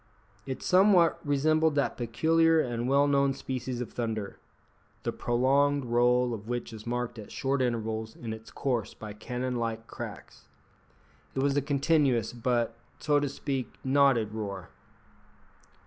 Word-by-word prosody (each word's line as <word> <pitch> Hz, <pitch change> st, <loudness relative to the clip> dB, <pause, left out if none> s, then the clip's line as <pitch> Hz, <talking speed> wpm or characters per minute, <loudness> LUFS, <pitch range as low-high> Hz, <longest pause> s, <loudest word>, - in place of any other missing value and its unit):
It 130 Hz, -, -5 dB
somewhat 185 Hz, -2 st, +5 dB
resembled 155 Hz, +2 st, +2 dB
that 140 Hz, -, +1 dB
peculiar 160 Hz, +7 st, +3 dB
and 120 Hz, -3 st, -1 dB
well 140 Hz, +1 st, +4 dB
known 140 Hz, -1 st, +2 dB
species 130 Hz, -1 st, -4 dB
of 120 Hz, -, -6 dB
thunder, 110 Hz, -4 st, -3 dB, 0.6 s
the -, -, -1 dB
prolonged 135 Hz, +3 st, +2 dB
roll 120 Hz, +1 st, +3 dB
of 110 Hz, -1 st, -7 dB
which 120 Hz, -1 st, -3 dB
is 110 Hz, +1 st, -10 dB
marked 120 Hz, -1 st, -3 dB
at 105 Hz, -, -10 dB
short 135 Hz, 0 st, -1 dB
intervals 110 Hz, -2 st, -2 dB
in 115 Hz, -2 st, -5 dB
its 110 Hz, 0 st, -10 dB
course 125 Hz, -5 st, -2 dB
by 105 Hz, -1 st, -8 dB
cannon 125 Hz, +3 st, -3 dB
like 115 Hz, -1 st, -3 dB
cracks. -, -, -9 dB, 0.9 s
It 135 Hz, -, 0 dB
was 140 Hz, 0 st, +2 dB
a 145 Hz, -, +3 dB
continuous, 140 Hz, -5 st, +2 dB
but, 120 Hz, -1 st, 0 dB, 0.2 s
so 145 Hz, -1 st, +2 dB
to 145 Hz, -1 st, -1 dB
speak, 135 Hz, -2 st, -4 dB
knotted 130 Hz, -5 st, +3 dB
roar. 100 Hz, -5 st, -5 dB
125 Hz, 145 wpm, -29 LUFS, 115-140 Hz, 0.9 s, somewhat